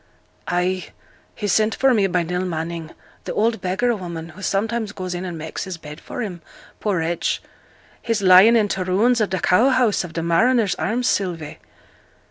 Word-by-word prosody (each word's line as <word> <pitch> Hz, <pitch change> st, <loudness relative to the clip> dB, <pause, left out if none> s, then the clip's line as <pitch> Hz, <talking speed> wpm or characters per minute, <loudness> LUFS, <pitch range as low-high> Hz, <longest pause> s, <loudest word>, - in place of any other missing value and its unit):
'Ay. 180 Hz, +1 st, -1 dB, 0.5 s
He 210 Hz, -, -3 dB
sent 215 Hz, +3 st, +2 dB
for 265 Hz, -1 st, +3 dB
me 205 Hz, -4 st, +3 dB
by 180 Hz, -1 st, 0 dB
Nell 180 Hz, +2 st, -2 dB
Manning, 165 Hz, -2 st, -4 dB, 0.4 s
th' -, -, -6 dB
old 225 Hz, +1 st, +1 dB
beggar 215 Hz, +6 st, 0 dB
woman, 170 Hz, -4 st, -6 dB
who 175 Hz, +5 st, -13 dB
sometimes 215 Hz, +2 st, -1 dB
goes 185 Hz, -2 st, -5 dB
in 180 Hz, +1 st, -4 dB
and 175 Hz, -2 st, -5 dB
makes 160 Hz, 0 st, -5 dB
his 185 Hz, -2 st, -6 dB
bed 150 Hz, 0 st, -10 dB
for 245 Hz, -, -5 dB
him, 180 Hz, -5 st, -6 dB, 0.4 s
poor 205 Hz, -3 st, 0 dB
wretch, 165 Hz, +1 st, -1 dB, 0.6 s
he's 230 Hz, -2 st, -1 dB
lying 190 Hz, +5 st, +8 dB
in 215 Hz, -3 st, +3 dB
t' 195 Hz, -1 st, -2 dB
ruins 215 Hz, +7 st, +2 dB
of 210 Hz, -, +1 dB
th' 190 Hz, -3 st, -3 dB
cow 220 Hz, +9 st, +4 dB
house 250 Hz, -7 st, +2 dB
of 175 Hz, -2 st, -9 dB
th' 165 Hz, -, -3 dB
Mariners' 220 Hz, +5 st, +3 dB
Arms, 240 Hz, +4 st, -1 dB
Sylvie.' 170 Hz, -6 st, -2 dB
185 Hz, 185 wpm, -21 LUFS, 175-220 Hz, 0.6 s, lying